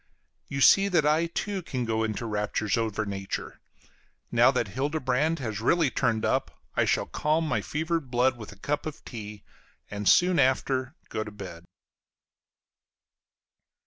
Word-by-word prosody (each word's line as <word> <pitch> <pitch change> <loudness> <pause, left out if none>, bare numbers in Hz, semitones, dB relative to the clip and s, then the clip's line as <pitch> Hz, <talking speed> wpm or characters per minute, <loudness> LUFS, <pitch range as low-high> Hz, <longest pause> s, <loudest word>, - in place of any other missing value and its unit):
You 135 - -3
see 195 +7 +7
that 175 -6 +2
I 155 +3 +3
too 195 +3 -3
can 130 -7 -3
go 110 0 0
into 110 +1 -2
raptures 105 -1 -1
over 110 -2 -1
nature. 95 -1 -5 0.7
Now - - +6
that - - 0
Hildebrand 145 +2 0
has 110 -7 -4
really 160 +3 +3
turned 115 -3 0
up, - - -1 0.2
I - - +3
shall - - +1
calm 155 +2 0
my - - 0
fevered 160 -2 -2
blood 125 +1 +2
with 110 -3 -9
a 105 - -14
cup 145 +9 -2
of 155 - -8
tea, 105 -3 -8 0.5
and 105 -1 0
soon 180 -2 +5
after 130 +1 +1
go 110 - -2
to 105 - -8
bed. 95 -5 -9
130 Hz, 150 wpm, -27 LUFS, 110-155 Hz, 0.7 s, see